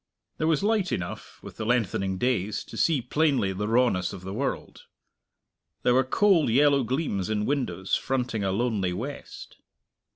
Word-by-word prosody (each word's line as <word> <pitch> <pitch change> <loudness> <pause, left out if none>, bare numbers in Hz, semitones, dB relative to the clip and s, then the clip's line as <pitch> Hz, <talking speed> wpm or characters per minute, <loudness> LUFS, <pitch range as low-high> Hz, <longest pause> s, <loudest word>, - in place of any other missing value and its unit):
There 155 - +1
was 160 0 +2
light 210 -3 +1
enough, 85 -1 -5
with - - -10
the 110 - -4
lengthening 100 -5 0
days, 105 -3 -1
to - - -12
see 150 -7 +2
plainly 135 -7 +1
the 105 +2 -3
rawness 115 -6 +2
of 90 - -8
the 95 +1 -6
world. 135 +6 -4 1.0
There 125 - +4
were 130 +1 +4
cold 170 - +3
yellow 140 +3 +4
gleams 115 - -2
in 105 -1 0
windows 100 -10 -2
fronting 125 -5 0
a 95 - 0
lonely 100 -4 0
west. 125 +10 -7
120 Hz, 160 wpm, -26 LUFS, 100-140 Hz, 1.0 s, There